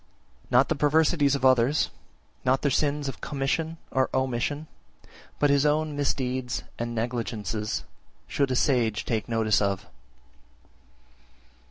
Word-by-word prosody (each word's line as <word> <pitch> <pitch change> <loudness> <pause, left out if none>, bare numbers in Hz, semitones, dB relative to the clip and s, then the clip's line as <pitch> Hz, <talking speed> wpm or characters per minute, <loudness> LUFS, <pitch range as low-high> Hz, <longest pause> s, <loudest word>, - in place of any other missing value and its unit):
50. - - -28
Not 125 +2 +4
the - - +3
perversities 150 0 +3
of 135 - -1
others, 130 +3 +3 0.5
not 130 +1 +2
their 145 - +2
sins 145 +1 0
of 135 - -6
commission 155 +4 -2
or 130 -1 +1
omission, 130 +3 -1 0.7
but 145 -1 +3
his 140 -1 +4
own 150 0 +1
misdeeds 130 -3 -1 0.2
and 120 0 -3
negligences 110 -2 -2 0.4
should 140 -2 0
a 130 - 0
sage 120 -5 +1
take 110 0 -2
notice 110 -2 +2
of. 100 -1 -1
130 Hz, 130 wpm, -26 LUFS, 120-145 Hz, 0.7 s, Not